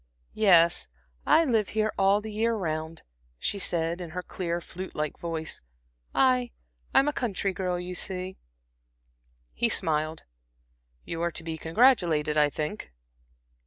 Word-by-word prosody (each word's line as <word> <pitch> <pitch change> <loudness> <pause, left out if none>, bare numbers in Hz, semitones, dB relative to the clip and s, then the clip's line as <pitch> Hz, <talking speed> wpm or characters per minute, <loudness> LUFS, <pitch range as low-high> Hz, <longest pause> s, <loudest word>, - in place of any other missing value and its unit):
"Yes, 175 -5 +5 0.4
I 320 +2 +6
live 225 -7 +1
here 215 0 +1
all 195 +1 +3
the 220 0 -7
year 225 +2 +1
round," 160 -4 -3 0.3
she 200 - -1
said, 170 -1 -1
in 175 - -6
her 180 - -2
clear, 170 -2 -3
flute 185 +2 -8
like 150 -1 -3
voice. 165 -2 -4 0.5
"I 255 -2 +3 0.4
I'm 275 - +4
a 295 - +1
country 200 -7 -1
girl, 180 -1 -2
you 180 +1 -5
see." 185 0 -2 1.2
He - - +1
smiled. 155 0 0 0.8
"You 165 0 -4
are 170 - +1
to 160 - -3
be 165 -1 -4
congratulated, 165 - +3
I 150 -1 +4
think." 150 - -5
180 Hz, 140 wpm, -27 LUFS, 160-210 Hz, 1.2 s, I